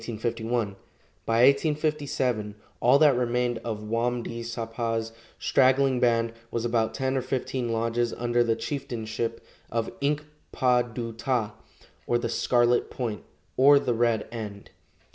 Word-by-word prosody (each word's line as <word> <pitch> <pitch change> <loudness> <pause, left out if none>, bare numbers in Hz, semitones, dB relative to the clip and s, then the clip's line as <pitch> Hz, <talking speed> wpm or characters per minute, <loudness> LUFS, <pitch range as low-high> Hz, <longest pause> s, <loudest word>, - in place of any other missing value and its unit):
By - - -10
1857 120 +3 0 0.2
all 125 +3 +5
that 145 -3 +5
remained 120 -1 0
of 110 -2 -5
Wam 115 +2 -1
di 115 0 -5
sapa's 115 -1 -3 0.3
straggling 130 0 +3
band 115 -2 +2 0.2
was 115 0 -2
about 115 -2 0
ten 130 0 -1
or 130 - +1
fifteen 125 -2 -2
lodges 115 +1 0
under 120 0 +1
the 115 -1 +1
chieftainship 115 -3 -4 0.2
of 115 -1 -2
Ink 150 +2 0 0.3
pa 125 -2 +3
du 115 -1 -5
ta, 115 -2 -1 0.5
or 120 - +3
the 120 -1 -2
"Scarlet 120 +1 +2
Point," 115 -5 -4 0.3
or 140 +2 +7
the 135 -3 +1
"Red 115 -2 +1
End." 105 -4 -7
120 Hz, 130 wpm, -26 LUFS, 115-130 Hz, 0.5 s, or